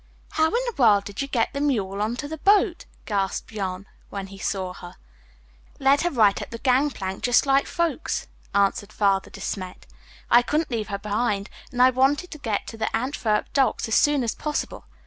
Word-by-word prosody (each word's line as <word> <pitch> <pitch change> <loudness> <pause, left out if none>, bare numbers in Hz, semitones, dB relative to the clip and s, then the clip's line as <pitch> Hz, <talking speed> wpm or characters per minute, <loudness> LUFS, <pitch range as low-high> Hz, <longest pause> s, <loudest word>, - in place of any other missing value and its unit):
"How 315 0 +3
in - - -4
the 480 - -2
world 210 -5 +5
did 205 +5 -6
you 275 - -2
get 240 -5 0
the 280 - -3
mule 205 -9 0
on 220 +3 0
to 290 - -5
the 315 +1 -6
boat!" 395 0 +3 0.2
gasped 200 -1 -2
Jan, 190 -2 -4 0.2
when 200 -1 -5
he 195 0 -12
saw 190 -3 -2
her. 175 -1 -11 0.8
"Led 275 +1 +4
her 350 - +1
right 215 - +3
up - - -7
the 230 - -6
gangplank 250 -7 0
just 245 +2 +3
like 275 0 +3
folks," 335 -3 -1 0.3
answered 200 +1 +1
Father 195 -2 +1
De - - -11
Smet. 185 -2 -5 0.5
"I 240 - +8
couldn't 300 +4 -1
leave 220 -3 -2
her 200 -1 -3
behind 205 0 -1 0.2
and 250 0 +3
I 255 - +7
wanted 275 +7 +1
to 305 - -8
get 220 -7 -2
to 225 - -9
the 220 - -1
Antwerp 225 -4 -1
docks 270 -3 +2
as 220 - -3
soon 290 +1 +4
as 230 - -1
possible. 300 -1 -4
230 Hz, 200 wpm, -24 LUFS, 200-280 Hz, 0.8 s, I